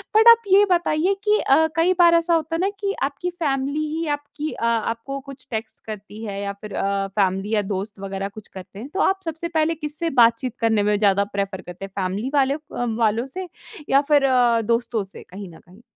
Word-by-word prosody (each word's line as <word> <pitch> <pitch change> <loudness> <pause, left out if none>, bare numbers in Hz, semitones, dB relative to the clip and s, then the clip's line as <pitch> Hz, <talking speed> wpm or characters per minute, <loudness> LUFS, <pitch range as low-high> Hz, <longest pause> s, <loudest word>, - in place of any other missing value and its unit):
But 445 +2 +6
आप 465 0 +8
ये 395 +1 +6
बताइए 345 +1 +2
कि 425 0 +3
अ, 315 +4 +4
कई 335 +3 +3
बार 340 -1 +7
ऐसा 335 +1 +2
होता 325 0 0
है - - -2
ना 390 - +2
कि 400 -1 -1
आपकी 280 +6 -2
फैमिली 285 -4 -1 0.2
ही 330 0 -2
आपकी 290 +1 -6
अ, - - -3
आपको 230 +4 -1
कुछ 275 -1 -12
टेक्स्ट 220 0 -5
करती 210 0 -8
है 200 -2 -4
या 200 0 -3
फिर 210 -1 -8
अ, 195 0 -1
फैमिली 195 +1 0
या 210 - +3
दोस्त 200 +1 -5
वग़ैरह 195 0 -4
कुछ 210 +1 -12
करते 190 +1 -11
हैं। 245 - -7
तो 390 - -3
आप 385 0 +2
सबसे 325 +1 -4
पहले 325 -1 +1
किससे 300 +2 -3
बातचीत 235 +1 +3
करने 225 -2 +2
में 210 0 +2
ज़्यादा 200 -1 +3
प्रेफ़र 195 -2 -2
करते 180 +2 -8
हैं? 195 - -12
फैमिली 195 +5 -2
वाले 275 -1 +3
अ, 295 - -5 0.4
वालों 230 +1 +1
से 370 +7 -6 0.4
या 275 - +5
फिर 285 -2 +5 0.4
दोस्तों 230 -1 0
से, 195 - -12
कहीं 190 0 -8
न 165 - -14
कहीं? 185 +6 -19
235 Hz, 215 wpm, -22 LUFS, 200-320 Hz, 0.4 s, आप